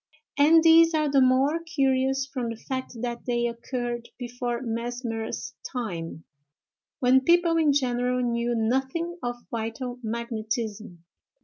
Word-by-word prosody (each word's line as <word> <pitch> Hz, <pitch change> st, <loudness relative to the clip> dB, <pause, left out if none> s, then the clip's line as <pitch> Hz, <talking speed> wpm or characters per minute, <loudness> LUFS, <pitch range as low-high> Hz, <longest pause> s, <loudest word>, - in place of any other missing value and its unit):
and 315 Hz, +3 st, +6 dB
these 330 Hz, 0 st, +6 dB
are 305 Hz, -1 st, +2 dB
the 275 Hz, -1 st, +4 dB
more 265 Hz, +5 st, +3 dB
curious 270 Hz, -5 st, +1 dB
from 255 Hz, -3 st, -4 dB
the 230 Hz, -, -4 dB
fact 260 Hz, +2 st, -5 dB
that 240 Hz, -1 st, -3 dB
they 240 Hz, -1 st, +1 dB
occurred 240 Hz, 0 st, -4 dB
before 245 Hz, -1 st, -3 dB
Mesmer's 235 Hz, 0 st, -4 dB, 0.2 s
time, 170 Hz, -, -5 dB, 0.8 s
when 260 Hz, +1 st, +5 dB
people 340 Hz, +3 st, +3 dB
in 310 Hz, -3 st, +4 dB
general 250 Hz, -2 st, +1 dB
knew 240 Hz, -1 st, 0 dB
nothing 265 Hz, +9 st, -1 dB
of 245 Hz, 0 st, -2 dB, 0.2 s
vital 235 Hz, +2 st, -4 dB
magnetism. 220 Hz, -4 st, -4 dB
245 Hz, 125 wpm, -26 LUFS, 235-270 Hz, 0.8 s, and